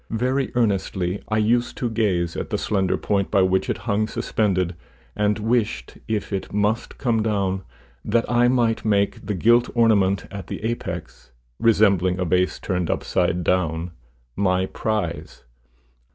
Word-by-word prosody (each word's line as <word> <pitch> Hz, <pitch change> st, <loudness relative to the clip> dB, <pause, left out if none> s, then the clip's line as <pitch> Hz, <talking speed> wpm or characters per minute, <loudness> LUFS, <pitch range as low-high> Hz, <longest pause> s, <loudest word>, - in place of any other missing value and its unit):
Very 130 Hz, +4 st, 0 dB
earnestly 95 Hz, -5 st, 0 dB
I 110 Hz, -, +1 dB
used 120 Hz, +3 st, +1 dB
to 125 Hz, -, -1 dB
gaze 95 Hz, -7 st, 0 dB
at -, -, -4 dB
the -, -, -1 dB
slender 95 Hz, -3 st, 0 dB
point 100 Hz, -2 st, 0 dB
by 95 Hz, -, +3 dB
which 95 Hz, +6 st, +1 dB
it 115 Hz, -, 0 dB
hung 110 Hz, -1 st, +1 dB
suspended, 100 Hz, -6 st, 0 dB, 0.4 s
and 105 Hz, 0 st, +1 dB
wished, 105 Hz, -, -1 dB
if 105 Hz, -2 st, -2 dB
it 95 Hz, -, -3 dB
must 105 Hz, +3 st, -1 dB
come 115 Hz, -4 st, +1 dB
down, 100 Hz, -3 st, 0 dB, 0.4 s
that 115 Hz, +2 st, +1 dB
I 120 Hz, 0 st, +3 dB
might 120 Hz, -3 st, +1 dB
make 100 Hz, -2 st, +1 dB
the 105 Hz, -, -3 dB
gilt 120 Hz, +6 st, +4 dB
ornament 100 Hz, -5 st, +3 dB
at 100 Hz, -3 st, -7 dB
the -, -, -6 dB
apex, 95 Hz, -, -5 dB, 0.3 s
resembling 100 Hz, -5 st, +3 dB
a 90 Hz, -, -1 dB
vase 90 Hz, +2 st, +1 dB
turned 90 Hz, -3 st, -2 dB
upside 90 Hz, -1 st, 0 dB
down, 85 Hz, -1 st, 0 dB, 0.4 s
my 95 Hz, -1 st, +1 dB
prize. 95 Hz, -4 st, -3 dB
100 Hz, 150 wpm, -23 LUFS, 95-115 Hz, 0.4 s, gilt